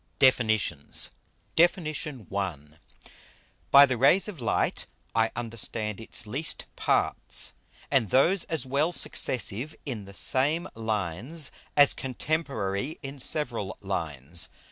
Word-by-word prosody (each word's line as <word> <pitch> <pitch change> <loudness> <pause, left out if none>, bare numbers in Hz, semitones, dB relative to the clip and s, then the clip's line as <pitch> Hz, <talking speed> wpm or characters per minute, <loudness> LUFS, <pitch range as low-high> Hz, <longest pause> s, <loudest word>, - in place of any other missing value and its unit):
DEFINITIONS 110 - +3 0.4
DEFIN. 175 +1 +3
I. 155 - -3 1.8
_By 140 0 +9
the 130 -2 -1
Rays 170 - +4
of 185 -10 -8
Light 115 - 0 0.3
I 115 0 +2
understand 115 -2 -3
its 115 +1 -1
least 135 +9 -1
Parts, - - +1 0.4
and 130 -7 +2
those 170 - +3
as 160 -4 -1
well 140 +6 0
Successive 125 - +1
in 115 -8 -5
the 100 0 -12
same 150 - +2
Lines, 110 - -1 0.3
as 145 -1 +7
Contemporary 135 -4 -3
in 135 +1 -7
several 120 -9 -1
Lines. 80 -5 -1
125 Hz, 110 wpm, -27 LUFS, 105-150 Hz, 1.8 s, By